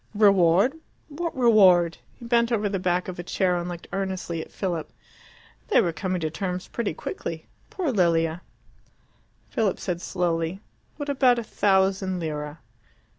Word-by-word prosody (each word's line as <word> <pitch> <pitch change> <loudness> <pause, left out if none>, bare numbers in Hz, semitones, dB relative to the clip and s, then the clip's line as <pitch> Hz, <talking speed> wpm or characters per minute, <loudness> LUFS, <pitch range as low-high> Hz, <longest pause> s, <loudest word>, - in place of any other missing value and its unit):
"Reward 200 +2 +5 0.4
what 325 +1 -4
reward?" 190 -9 +5 0.2
He 235 - -12
bent 235 0 +2
over 215 -3 +1
the 195 -1 -2
back 180 0 0
of 180 -1 -6
a - - -4
chair 180 0 +1
and 175 0 -3
looked 175 -1 -7
earnestly 190 -4 -3
at - - -10
Philip. 175 -5 -3 0.8
They 430 - +4
were 170 -3 +1
coming 185 +1 -2
to 155 -1 -2
terms 180 +2 -4
pretty 220 -9 -3
quickly. 165 -1 -6 0.2
Poor 345 -7 -2
Lilia! 165 -4 +2 1.1
Philip 215 -4 0
said 175 -2 -3
slowly, 175 -1 -1 0.4
"What 290 -1 -5
about 260 -3 +4
a 235 - -2
thousand 190 -2 +1
lire?" 150 -2 -4
185 Hz, 150 wpm, -25 LUFS, 170-215 Hz, 1.1 s, Reward